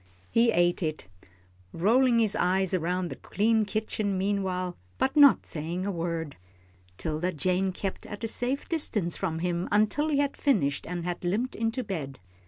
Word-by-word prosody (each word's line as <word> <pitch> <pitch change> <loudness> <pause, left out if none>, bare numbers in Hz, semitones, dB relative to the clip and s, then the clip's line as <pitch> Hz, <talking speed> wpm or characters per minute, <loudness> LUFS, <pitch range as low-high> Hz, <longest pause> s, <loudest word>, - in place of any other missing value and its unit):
He 230 +1 +4
ate 175 -1 +2
it, 155 - -3 0.6
rolling 235 +7 +3
his 220 -3 +2
eyes 190 +1 +1
around 180 0 0
the - - -6
clean 220 +2 +1
kitchen 210 -1 -2
meanwhile, 185 -2 -1 0.2
but 265 - 0
not 285 -7 +7
saying 170 +4 -4
a 200 - -1
word. 165 -4 -3 0.6
'Tilda 160 +3 -2
Jane 185 +4 0
kept 190 +1 -5
at 205 +1 -8
a - - 0
safe 250 +5 -2
distance 210 - 0
from 165 -4 -2
him 175 0 -1
until 215 +9 +2
he 300 -3 +1
had 285 0 +1
finished 180 - +1
and 175 0 -4
had 175 0 -4
limped 210 +9 -1
into 225 +3 -1
bed. 155 - -5
190 Hz, 165 wpm, -28 LUFS, 175-225 Hz, 0.6 s, not